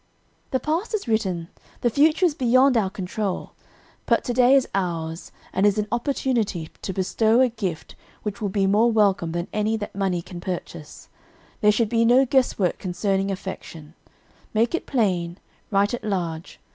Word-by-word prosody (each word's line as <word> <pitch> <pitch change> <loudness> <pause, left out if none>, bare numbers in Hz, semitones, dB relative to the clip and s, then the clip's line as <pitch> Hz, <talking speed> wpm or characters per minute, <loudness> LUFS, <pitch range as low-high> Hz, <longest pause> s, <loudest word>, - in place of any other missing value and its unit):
"The 260 - 0
past 330 - -1
is 405 - -4
written, 190 -7 -1 0.3
the 240 - +2
future 310 - +4
is 335 - +2
beyond 255 0 +4
our 210 -5 +2
control, 190 +1 -4 0.6
but - - +3
to 245 - -2
day 250 +2 +5
is 270 - +3
ours, 165 -3 -3 0.2
and 190 - +1
is 205 0 +4
an 210 0 0
opportunity 235 - -1
to - - -3
bestow 220 +5 +2
a 260 -1 +5
gift 195 -8 -5 0.3
which 210 +1 -5
will 205 - -1
be 195 0 +1
more 215 +5 +4
welcome 200 -6 +2
than 170 +2 -2
any 215 +1 0
that 205 -1 -6
money 185 -3 -1
can 175 -1 -9
purchase. 170 -4 -7 0.5
There 210 - +5
should 215 +1 +1
be 230 0 +2
no 245 +3 +5
guesswork 245 -8 +1
concerning 195 +1 -1
affection; 170 -5 -7 0.6
'make 230 +6 +2
it 340 - -2
plain,' 180 -9 0 0.3
'write 200 +1 +2
it 240 - -4
large.' 175 -5 -3
205 Hz, 170 wpm, -23 LUFS, 185-240 Hz, 0.6 s, day